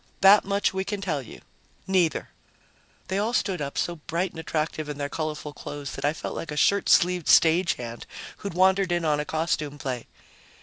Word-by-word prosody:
"That 195 +2 +8
much 200 0 0
we 190 0 -1
can 205 +1 -4
tell 165 -8 -2
you. 125 - -12 0.4
Neither." 180 -5 +1 0.8
They 190 +1 -1
all 220 +4 0
stood 195 -7 0
up, 140 -1 -4
so 175 0 -1
bright 170 +4 -2
and - - -9
attractive 155 -1 -2
in 145 - -5
their 145 0 -3
colorful 155 -1 -4
clothes 145 -1 -7
that - - -7
I 145 - +3
felt 155 - -6
like - - -5
a 150 - -5
shirt 200 +6 +3
sleeved 180 -2 +4
stage 170 +2 +5
hand 120 -1 -8 0.3
who'd 200 -4 -6
wandered 190 0 +3
in 175 -1 0
on 150 -1 +2
a 150 - -2
costume 155 -2 -1
play. 130 -4 -4
165 Hz, 200 wpm, -26 LUFS, 150-190 Hz, 0.8 s, That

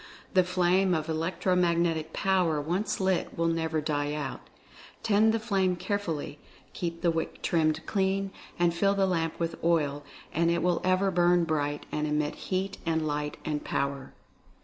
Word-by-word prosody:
The 185 -2 +5
flame 180 +1 +2
of 155 0 -2
Electro 165 +3 0
Magnetic 170 -3 +1
Power 180 -5 +1
once 175 +8 -1
lit 190 -1 0
will 165 - +1
never 160 -1 0
die 145 -1 -1
out 145 -3 -4 0.4
— - - -20
tend 215 +1 +4
the 225 - +1
flame 195 -5 +1
carefully, 175 -6 -3 0.3
keep 170 -1 -4
the 170 - +4
wick 165 0 -4
trimmed 160 -1 +1
clean, 195 0 0 0.3
and 175 -1 +3
fill 200 +3 +2
the 195 -1 +3
lamp 165 -3 -1
with 165 -1 -3
oil, 150 -4 +1 0.3
and 170 +1 +2
it 170 0 +1
will 180 -1 +1
ever 185 +1 +2
burn 175 0 +4
bright 145 -3 -1
and 150 0 -1
emit 150 0 0 0.2
heat 190 +1 -1
and 160 -2 0
light 150 0 -2
and 150 -1 -2
Power. 140 -1 -2
170 Hz, 170 wpm, -28 LUFS, 155-185 Hz, 0.4 s, The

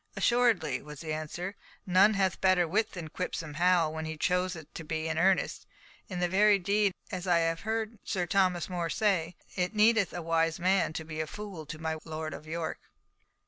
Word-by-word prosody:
"Assuredly," 225 - +2
was 150 -1 -10
the 155 -2 -3
answer; 170 +5 -4 0.3
"none 195 +3 +5
hath 190 -2 0
better 185 -2 +4
wit 215 +6 0
than 170 -3 -6
Quipsome 160 -4 -4
Hal, 175 -2 +3
when 160 0 -4
he 160 0 -5
chooseth 180 -2 -1
to 165 - -7
be 160 0 -3
in 160 0 -1
earnest. 190 +2 +1 0.4
In 180 -3 -4
very 205 +3 +5
deed, 200 +2 +2 0.2
as 185 -1 -4
I 175 -1 +4
have 165 0 +1
heard 220 0 -3
Sir 185 -3 -1
Thomas 185 -1 +2
More 175 -2 -2
say, 180 -4 +1 0.2
it 180 +4 -1
needeth 215 -2 +4
a 175 - -5
wise 165 0 +1
man 185 0 +2
to 160 - -4
be 155 0 -3
fool 195 -5 -8
to 155 - -6
my 160 0 -2
Lord 155 -1 -5
of 155 - -9
York." 165 0 -3
175 Hz, 185 wpm, -30 LUFS, 160-195 Hz, 0.4 s, none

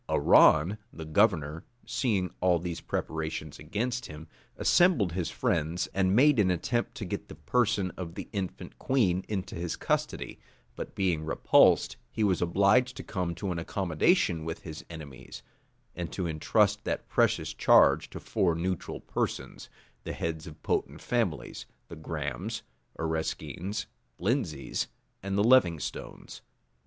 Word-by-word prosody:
Arran, 85 +8 +5
the 80 - -8
governor, 80 -3 +2 0.2
seeing 100 - 0
all 90 -1 +3
these 85 0 -5
preparations 80 -2 -4
against 115 +11 -3
him, 75 +1 -10 0.3
assembled 170 - +4
his 90 0 -2
friends, 85 -8 0
and 95 0 +2
made 140 +1 +5
an 95 -3 +4
attempt 120 +7 -1
to 105 - -5
get 90 - -5
the - - -10
person 100 +3 +1
of 85 -2 -6
the - - -6
infant 95 -4 -5
queen 95 -9 +1
into 100 -3 -3
his 85 -1 -3
custody; - - -2 0.4
but - - -7
being 90 -5 0
repulsed, 80 - +4
he 110 - -2
was 95 -4 +2
obliged 100 +8 +3
to - - -6
come 90 -4 -3
to 100 -3 -3
an 85 - -2
accommodation 85 - +1
with 80 0 -5
his 80 -2 -8
enemies, 70 -5 -10 0.5
and 85 -1 -4
to 95 - -3
intrust 80 -2 +2
that - - -3
precious - - +1
charge - - +5
to - - -8
four 85 -4 +1
neutral 90 +1 -3
persons, - - -4 0.3
the - - -4
heads 80 -1 -4
of 75 -2 -12
potent - - -1
families, - - -2 0.2
the - - -8
Grahams, 80 - -4 0.3
Areskines, 80 +5 -3 0.3
Lindseys, 95 - -1 0.3
and 95 +1 -2
Levingstones. 100 - +1
90 Hz, 140 wpm, -29 LUFS, 80-105 Hz, 0.5 s, Arran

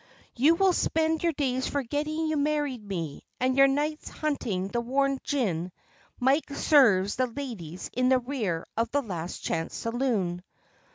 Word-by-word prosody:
You 295 +7 +5
will 380 +1 +3
spend 320 -1 +1
your 340 - +2
days 260 -3 -1
forgetting 295 +4 -2
you 315 0 0
married 290 -5 0
me 170 -8 -5 0.2
and 255 +1 +1
your 275 0 +7
nights 295 +3 -1
hunting 220 -11 -2
the 235 +3 -1
warm 275 +2 +1
gin 185 - -1 0.5
Mike 270 +5 +2
serves 205 -12 +4
the 255 0 +2
ladies 225 - -6
in 255 +1 +2
the 260 - +5
rear 235 -10 -2
of 230 +1 0
the 285 +3 0
Last 180 -6 -5
Chance 165 0 -2
Saloon. 230 -8 -1
255 Hz, 155 wpm, -27 LUFS, 205-290 Hz, 0.5 s, your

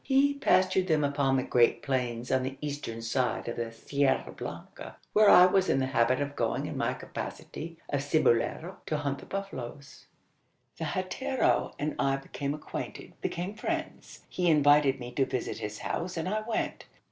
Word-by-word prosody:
He 275 +1 +3
pastured 185 -7 +3
them 155 -3 +2
upon 140 -1 +2
the 130 - +1
great 120 -2 +3
plains 125 -3 -1
on 130 0 +3
the 130 +1 -4
eastern 140 -6 -5
side 125 +2 0
of 120 - -3
the 115 -1 -3
Sierra 140 +4 0
Blanca - - -8 0.2
where 215 -1 +6
I 180 - +9
was 185 +1 +3
in - - +3
the 135 - +1
habit 120 +2 +3
of 145 0 -3
going - - 0
in - - -5
my - - 0
capacity 165 +1 -7
of 145 - -1
cibolero 155 +4 +1
to 155 - 0
hunt 140 -2 -2
the - - -12
buffaloes. 140 -8 -7 0.7
The 160 - -3
hatero 185 - 0
and 150 +1 -2
I 135 0 +2
became 140 +1 -4
acquainted 150 - -7
became 180 +4 -3
friends. 215 - -4
He 180 -1 0
invited 145 -3 +5
me 120 0 -7
to 135 +2 +1
visit 125 - -3
his 105 0 -5
house, 175 0 -3
and 165 - -2
I 215 +3 0
went. 225 - -2
145 Hz, 175 wpm, -29 LUFS, 130-180 Hz, 0.7 s, I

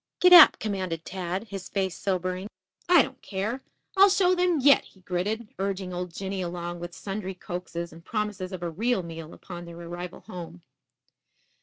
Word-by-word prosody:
"Gid 360 0 +7
ap!" 345 -3 +11
commanded 185 -6 -3
Tad, 185 +1 -3
his 195 -1 -7
face 190 -3 -1
sobering. 185 0 -2 0.4
"I 350 -5 +8
don't 260 - -9
care. 215 +6 -3 0.3
I'll 395 +1 +8
show 370 -1 +4
them 355 -3 +2
yet," 280 +1 +6
he 190 - -20
gritted, 205 +5 -2
urging 190 -1 -2
old 180 0 -4
Jinny 190 +2 -4
along 175 0 -4
with 175 0 -7
sundry 195 -1 -5
coaxes 175 -1 -6
and 165 +1 -14
promises 210 -3 -3
of 185 -2 -6
a 170 - -2
real 220 +3 0
meal 165 -1 -8
upon 175 -2 -9
their 170 0 -10
arrival 175 +1 -7
home. 175 -3 -9
185 Hz, 170 wpm, -27 LUFS, 175-210 Hz, 0.4 s, ap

